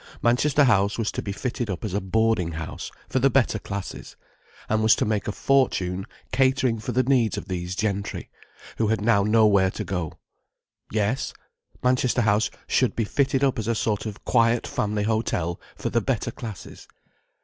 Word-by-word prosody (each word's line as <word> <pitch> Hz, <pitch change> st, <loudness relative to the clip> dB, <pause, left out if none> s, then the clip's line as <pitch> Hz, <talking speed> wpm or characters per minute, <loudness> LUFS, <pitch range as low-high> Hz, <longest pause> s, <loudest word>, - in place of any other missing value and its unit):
Manchester 135 Hz, +5 st, +3 dB
House 100 Hz, -5 st, +3 dB
was 115 Hz, -2 st, -1 dB
to -, -, -3 dB
be 100 Hz, -, -4 dB
fitted 120 Hz, +2 st, -3 dB
up 90 Hz, +2 st, -3 dB
as 100 Hz, -, -4 dB
a 100 Hz, -, 0 dB
boarding 105 Hz, -3 st, +1 dB
house 80 Hz, +1 st, -6 dB, 0.2 s
for 130 Hz, -, 0 dB
the 135 Hz, +2 st, +4 dB
better 125 Hz, -4 st, +2 dB
classes, 100 Hz, -1 st, -6 dB, 0.5 s
and 110 Hz, 0 st, +1 dB
was 110 Hz, 0 st, +5 dB
to -, -, 0 dB
make 105 Hz, -1 st, -1 dB
a -, -, 0 dB
fortune 95 Hz, -8 st, +1 dB, 0.2 s
catering 130 Hz, -3 st, +2 dB
for 110 Hz, -, -4 dB
the 130 Hz, +2 st, +2 dB
needs 125 Hz, -4 st, +2 dB
of -, -, -6 dB
these 90 Hz, -1 st, -3 dB
gentry, 100 Hz, -1 st, -3 dB, 0.5 s
who 110 Hz, -, +2 dB
had 110 Hz, +1 st, +1 dB
now 105 Hz, 0 st, +3 dB
nowhere 105 Hz, -2 st, +4 dB
to -, -, -5 dB
go. 90 Hz, -5 st, -3 dB, 0.8 s
Yes, 110 Hz, +4 st, 0 dB, 0.5 s
Manchester 125 Hz, -1 st, +2 dB
House 105 Hz, +1 st, +2 dB, 0.2 s
should 130 Hz, -, +1 dB
be 115 Hz, -, 0 dB
fitted 135 Hz, +3 st, +1 dB
up 135 Hz, -4 st, +2 dB
as 110 Hz, -, -3 dB
a 115 Hz, -, +1 dB
sort 110 Hz, 0 st, -1 dB
of 105 Hz, -1 st, -8 dB
quiet 115 Hz, -1 st, +3 dB
family 105 Hz, 0 st, -1 dB
hotel 105 Hz, -6 st, -1 dB
for -, -, -4 dB
the -, -, +2 dB
better -, -, -1 dB
classes. 110 Hz, -7 st, -9 dB
110 Hz, 180 wpm, -25 LUFS, 100-120 Hz, 0.8 s, was